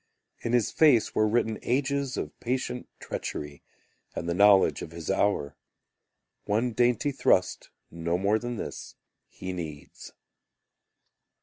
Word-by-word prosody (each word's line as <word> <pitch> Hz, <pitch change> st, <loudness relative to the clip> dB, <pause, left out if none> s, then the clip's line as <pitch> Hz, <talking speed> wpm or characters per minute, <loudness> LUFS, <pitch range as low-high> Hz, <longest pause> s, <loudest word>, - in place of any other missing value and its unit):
In 115 Hz, -, -3 dB
his 120 Hz, -4 st, +2 dB
face 145 Hz, -8 st, +4 dB
were 110 Hz, -, +3 dB
written 110 Hz, 0 st, 0 dB
ages 140 Hz, +1 st, -1 dB
Of -, -, -3 dB
patient 125 Hz, 0 st, -3 dB
treachery 75 Hz, -1 st, -5 dB, 0.5 s
And -, -, -4 dB
the 85 Hz, -, 0 dB
knowledge 100 Hz, +1 st, +5 dB
of -, -, -6 dB
his 85 Hz, +1 st, -4 dB
hour. 95 Hz, -7 st, 0 dB, 0.9 s
One 115 Hz, +4 st, +1 dB
dainty 125 Hz, +5 st, +2 dB
thrust, 95 Hz, -8 st, +1 dB, 0.2 s
no 85 Hz, +1 st, -1 dB
more 100 Hz, +4 st, +2 dB
Than 120 Hz, +1 st, -4 dB
this, -, -, -7 dB, 0.3 s
he 95 Hz, 0 st, -7 dB
needs. 80 Hz, -5 st, -8 dB
110 Hz, 125 wpm, -27 LUFS, 90-125 Hz, 0.9 s, knowledge